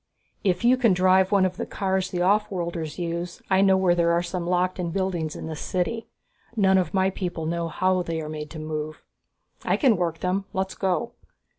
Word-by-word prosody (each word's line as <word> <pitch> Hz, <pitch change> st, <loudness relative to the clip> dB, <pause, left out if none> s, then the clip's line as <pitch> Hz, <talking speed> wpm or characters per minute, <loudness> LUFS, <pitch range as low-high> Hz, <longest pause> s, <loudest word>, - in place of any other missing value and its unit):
"If 185 Hz, -2 st, +1 dB
you 250 Hz, +2 st, +5 dB
can 230 Hz, -6 st, +4 dB
drive 185 Hz, +1 st, +4 dB
one 200 Hz, -2 st, +4 dB
of 185 Hz, 0 st, -2 dB
the -, -, -3 dB
cars 190 Hz, -1 st, -1 dB
the 175 Hz, -, -2 dB
offworlders 180 Hz, -5 st, 0 dB
use, 170 Hz, 0 st, -4 dB
I 190 Hz, 0 st, +5 dB
know 190 Hz, -1 st, +5 dB
where 185 Hz, -2 st, +3 dB
there 170 Hz, -1 st, +2 dB
are 170 Hz, +1 st, +2 dB
some 175 Hz, 0 st, -4 dB
locked 180 Hz, +1 st, +1 dB
in 175 Hz, -2 st, -1 dB
buildings 175 Hz, -4 st, -2 dB
in -, -, -6 dB
this 160 Hz, -1 st, -5 dB
city. 225 Hz, +6 st, -2 dB, 0.5 s
None 190 Hz, -3 st, +4 dB
of 180 Hz, 0 st, -2 dB
my 190 Hz, 0 st, +3 dB
people 175 Hz, -4 st, -4 dB
know 170 Hz, +1 st, -1 dB
how 185 Hz, +3 st, +1 dB
they 165 Hz, -2 st, -3 dB
are 155 Hz, -, -5 dB
made 150 Hz, -1 st, -6 dB
to 160 Hz, -, -9 dB
move." 155 Hz, 0 st, -5 dB, 0.6 s
"I -, -, +1 dB
can 250 Hz, -, +4 dB
work 170 Hz, -2 st, -1 dB
them 190 Hz, +2 st, 0 dB
let's 190 Hz, 0 st, -2 dB
go." 195 Hz, +5 st, -1 dB
180 Hz, 205 wpm, -25 LUFS, 170-190 Hz, 0.6 s, you